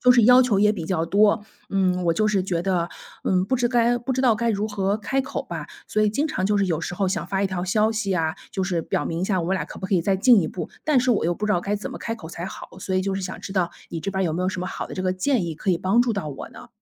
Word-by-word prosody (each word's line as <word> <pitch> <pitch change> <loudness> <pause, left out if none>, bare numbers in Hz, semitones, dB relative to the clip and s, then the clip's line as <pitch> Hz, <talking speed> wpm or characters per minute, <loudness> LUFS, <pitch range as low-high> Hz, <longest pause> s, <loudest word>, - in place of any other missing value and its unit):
就 250 - +5
是 240 - +5
要 250 +3 +8
求 240 -6 +2
也 210 +1 +4
比 175 -6 -5
较 165 -3 0
多。 205 +4 +3 0.3
嗯， 185 -2 +1
我 165 -1 +2
就 215 0 +2
是 200 -2 +2
觉 175 -3 -1
得， 175 -3 0 0.4
嗯， 185 -1 +2
不 260 +6 0
知 240 0 +1
该 240 0 +3
不 255 +3 -2
知 260 - 0
道 240 -4 +5
该 235 +2 -1
如 210 -1 0
何 200 0 0
开 270 +6 -1
口 260 - -4
吧。 - - -6 0.2
所 215 - 0
以 210 - +4
经 280 +9 0
常 190 -11 -1
就 210 0 +2
是 200 - +3
有 165 -3 0
时 175 - -4
候 195 +1 0
想 180 -2 -2
发 195 +1 -1
一 - - +3
条 185 -2 -3
消 215 +4 +2
息 210 -3 -1
啊， 160 -2 0 0.2
就 190 - -2
是 180 -3 0
表 150 - -2
明 165 +1 -3
一 - - 0
下 190 -3 +1
我 165 - -3
们 190 - +1
俩 185 - -1
可 - - -10
不 - - -7
可 190 - 0
以 180 - +4
再 190 +3 +1
进 225 +2 +6
一 160 - -1
步， 180 - -6
但 300 -4 +3
是 250 0 +2
我 210 - +2
又 175 - +1
不 210 - -4
知 210 - +2
道 175 - +2
该 200 +3 -1
怎 205 - -6
么 - - -7
开 225 - -3
口 180 -8 -10
才 170 +2 -6
好。 - - -8
所 190 0 -3
以 185 - +2
就 195 0 -1
是 195 - -2
想 185 0 -5
知 195 - -7
道， 185 -3 +1 0.2
你 165 - -4
这 195 - -3
边 190 0 -1
儿 - - +1
有 160 - 0
没 175 - -2
有 185 - +1
什 185 -1 -3
么 180 - -3
好 - - -5
的 - - -8
这 185 - -3
个 185 0 +1
建 220 +3 +1
议 165 -2 -4
可 190 - -1
以 175 - +3
帮 190 +6 +2
助 245 -2 +2
到 200 -7 -3
我 140 - -7
呢？ - - -13
195 Hz, 370 characters per minute, -24 LUFS, 180-220 Hz, 0.4 s, 要